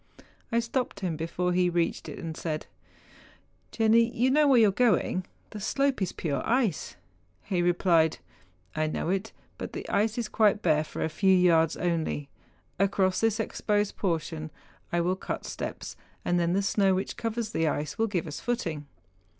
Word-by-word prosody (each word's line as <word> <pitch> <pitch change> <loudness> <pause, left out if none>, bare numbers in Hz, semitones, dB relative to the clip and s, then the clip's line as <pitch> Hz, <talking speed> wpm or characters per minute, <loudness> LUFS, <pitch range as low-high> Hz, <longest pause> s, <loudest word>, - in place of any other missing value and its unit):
I 235 - +3
stopped 235 -3 -2
him 175 -4 -1
before 175 +3 -1
he 180 0 +3
reached 170 -1 -1
it, - - -7
and 160 -1 -5
said, 155 -2 -3 0.5
' - - -29
Jenni, 230 +1 +4
you 250 +3 +2
know 300 +1 +4
where 270 -3 +6
you 220 -2 +6
are - - 0
going, 200 -4 +1 0.2
the 215 - -7
slope 275 +3 0
is 185 - 0
pure 140 -5 -2
ice 230 - 0 0.2
?' 90 +1 -39
He 180 -2 +2
re¬ 175 0 +2
plied, 165 -4 +3 0.3
' 90 0 -35
I 155 0 +1
know 155 - -2
it, 195 +4 -1 0.3
but - - -6
the - - -6
ice 215 +2 +1
is 235 -2 -1
quite 215 -1 +2
bare 155 -3 +3
for 155 - -5
a - - +1
few 190 +4 +3
yards 165 -3 +4
only. 160 -4 -1 0.5
Across 195 -1 +2
this 225 0 +2
exposed 210 -2 0
portion 160 -4 -2 0.4
I 175 - +1
will 180 +2 +1
cut - - -5
steps, - - -6 0.3
and 175 0 +2
then 170 0 +1
the 200 +1 +1
snow 195 -1 +3
which 190 - -3
covers 225 -1 -3
the 165 -5 +1
ice 150 +3 -2
will 225 - +3
give 185 -5 -2
us 150 -2 -6
footing. 165 -12 -3
185 Hz, 190 wpm, -28 LUFS, 160-220 Hz, 0.5 s, where